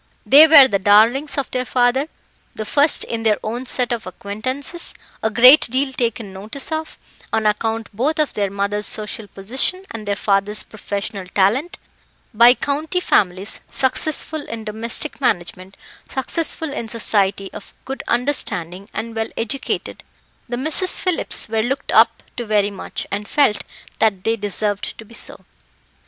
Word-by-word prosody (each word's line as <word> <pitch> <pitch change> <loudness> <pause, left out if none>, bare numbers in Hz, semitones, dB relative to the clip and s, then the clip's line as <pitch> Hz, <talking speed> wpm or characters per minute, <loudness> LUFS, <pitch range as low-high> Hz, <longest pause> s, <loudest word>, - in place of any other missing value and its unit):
They 300 +4 +8
were 290 -4 +9
the 200 -6 0
darlings 225 +10 +4
of 280 - -2
their 255 -1 -1
father, 250 +3 +1 0.5
the 215 - -5
first 290 +7 +2
in 230 -1 -4
their 220 -2 +2
own 240 +4 -4
set 245 -1 +1
of 235 -4 -3
acquaintances, 255 - -3 0.3
a 220 - +1
great 250 +7 +7
deal 265 +2 -1
taken 230 -5 -2
notice 215 +10 -7
of, 315 0 -4 0.3
on 220 -1 0
account 225 +1 -1
both 280 +8 0
of 305 -2 +1
their 200 -2 -1
mother's 200 +1 -1
social 215 0 -2
position 260 - -2
and 215 -2 -7
their 200 - 0
father's 200 +1 0
professional 200 -2 -6
talent, 210 - +1 0.6
by 235 +3 +7
county 305 +7 -2
families; 195 - 0
successful 310 +3 0
in 225 -1 -6
domestic 225 +7 -2
management, 185 -4 -2 0.3
successful 320 +3 -2
in 235 - -4
society, 200 -3 0
of - - -10
good 270 0 -5
understanding, 200 - 0
and 230 +1 -5
well 225 0 -2
educated, 250 +4 -3 0.5
the 240 - -3
Misses 315 +7 0
Phillips 365 -4 +1
were 220 0 0
looked 270 +5 -3
up - - +4
to 240 - -3
very 205 -1 +2
much, 195 - -6
and 205 +1 -3
felt 280 -8 +2 0.4
that 205 -4 +1
they 225 - +1
deserved 205 -1 -3
to 225 - -11
be 230 - -17
so. - - -6
225 Hz, 155 wpm, -20 LUFS, 205-270 Hz, 0.6 s, were